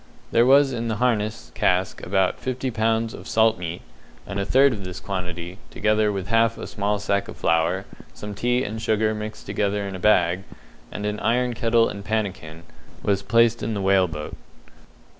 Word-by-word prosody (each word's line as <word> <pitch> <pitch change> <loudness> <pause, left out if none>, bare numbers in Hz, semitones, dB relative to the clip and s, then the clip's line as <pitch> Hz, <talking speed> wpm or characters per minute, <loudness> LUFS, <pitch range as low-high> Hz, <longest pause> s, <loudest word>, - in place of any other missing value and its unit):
There 120 +1 +4
was 135 0 +5
in 115 -1 -3
the 110 - -1
harness 110 - -1
cask 90 +1 0
about 95 0 +1
fifty 130 0 -3
pounds 115 0 0
of - - -10
salt 110 0 +3
meat, 85 -1 -5 0.4
and 100 0 -4
a 100 - -1
third 135 0 +5
of 100 -3 -6
this 90 -1 -6
quantity, 90 -1 -5
together 110 -2 +1
with 95 -1 -4
half 115 0 +3
a - - -6
small 105 0 -1
sack 100 -1 -1
of - - -9
flour, 85 +4 +1 0.3
some 105 0 -8
tea 120 +4 0
and 110 0 -5
sugar 110 -1 +1
mixed 110 0 -6
together 100 -1 -1
in 100 - -6
a 95 - -6
bag, 90 -2 +3 0.5
and 105 - -5
an 105 0 -2
iron 125 +1 +1
kettle 115 0 +3
and 100 0 -6
pannikin, 95 -7 -3 0.4
was 100 -1 +1
placed 115 +1 +3
in 110 - -2
the - - -2
whale 95 -1 +4
boat. 75 -2 -6
105 Hz, 185 wpm, -23 LUFS, 95-115 Hz, 0.5 s, was